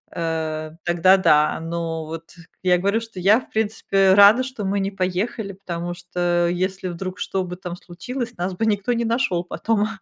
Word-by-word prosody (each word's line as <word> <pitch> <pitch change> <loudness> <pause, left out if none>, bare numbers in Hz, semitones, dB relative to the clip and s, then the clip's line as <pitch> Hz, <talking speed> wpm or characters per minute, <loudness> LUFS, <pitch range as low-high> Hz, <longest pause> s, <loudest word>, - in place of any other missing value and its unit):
э, 160 -2 -2
тогда 175 +2 +4
да. 150 -5 +3
Но 165 -1 -3
вот 165 +1 -9 0.3
я 180 -1 +4
говорю, 200 +5 +1
что 225 -4 -9
я, 200 +6 +5
в - - -15
принципе, 205 -3 +2
рада, 205 +5 +7
что 255 -5 -5
мы 200 +1 0
не 195 0 -1
поехали, 195 +2 -2
потому 175 -2 -5
что 175 -1 0
если 185 +1 -2
вдруг 185 +1 -6
что 190 -1 -1
бы 180 0 -6
там 180 -1 -7
случилось, 230 +8 -6
нас 180 +2 -2
бы 220 - -1
никто 210 +2 +1
не 235 0 -1
нашёл 230 -7 0
потом. 210 +4 0
185 Hz, 180 wpm, -22 LUFS, 175-205 Hz, 0.3 s, рада